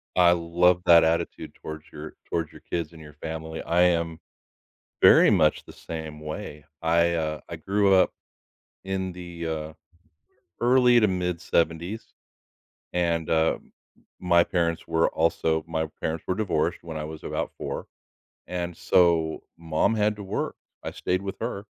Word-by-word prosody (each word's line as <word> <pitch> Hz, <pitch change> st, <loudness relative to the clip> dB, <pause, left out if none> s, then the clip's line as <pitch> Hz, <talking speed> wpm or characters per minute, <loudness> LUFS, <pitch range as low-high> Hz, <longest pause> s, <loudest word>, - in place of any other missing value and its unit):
I 90 Hz, -1 st, +6 dB
love 90 Hz, +1 st, +3 dB
that 85 Hz, -1 st, +8 dB
attitude 80 Hz, +1 st, -1 dB
towards 80 Hz, 0 st, -8 dB
your 75 Hz, +1 st, -8 dB, 0.2 s
towards 80 Hz, -2 st, -2 dB
your -, -, -14 dB
kids 85 Hz, -1 st, -2 dB
and 80 Hz, -, -13 dB
your 75 Hz, -1 st, -12 dB
family. 80 Hz, 0 st, -5 dB
I 85 Hz, +1 st, +1 dB
am 85 Hz, -2 st, +1 dB, 0.8 s
very -, -, +8 dB
much 75 Hz, -1 st, +3 dB
the -, -, -12 dB
same 80 Hz, -2 st, -7 dB
way. 75 Hz, -1 st, -7 dB, 0.2 s
I, 85 Hz, +1 st, +3 dB
uh, 80 Hz, -2 st, -2 dB
I 85 Hz, -, -4 dB
grew 100 Hz, +4 st, +2 dB
up 95 Hz, -, +4 dB, 0.7 s
in 95 Hz, -1 st, -2 dB
the, 85 Hz, -2 st, -7 dB
uh, 80 Hz, -1 st, -4 dB, 0.9 s
early 125 Hz, 0 st, +5 dB
to 110 Hz, -, +5 dB
mid-seventies, 90 Hz, +1 st, -1 dB, 0.8 s
and, 85 Hz, -2 st, 0 dB
uh, 80 Hz, 0 st, +2 dB, 0.6 s
my 85 Hz, -1 st, +4 dB
parents 85 Hz, -1 st, -1 dB
were 80 Hz, 0 st, +2 dB
also 80 Hz, 0 st, +1 dB
my 80 Hz, -1 st, -1 dB
parents 80 Hz, 0 st, -2 dB
were 95 Hz, -, 0 dB
divorced 90 Hz, -6 st, 0 dB
when 80 Hz, -2 st, -6 dB
I 75 Hz, -, -4 dB
was 80 Hz, 0 st, -9 dB
about -, -, -3 dB
4, -, -, -5 dB, 0.6 s
and 90 Hz, -1 st, -4 dB
so 85 Hz, -3 st, +2 dB
mom 80 Hz, +7 st, +1 dB
had 105 Hz, 0 st, +1 dB
to 105 Hz, -, -8 dB
work. 95 Hz, -, -3 dB, 0.3 s
I -, -, -4 dB
stayed 90 Hz, +1 st, -1 dB
with 95 Hz, -1 st, -5 dB
her 110 Hz, -3 st, -4 dB
85 Hz, 150 wpm, -26 LUFS, 80-90 Hz, 0.9 s, that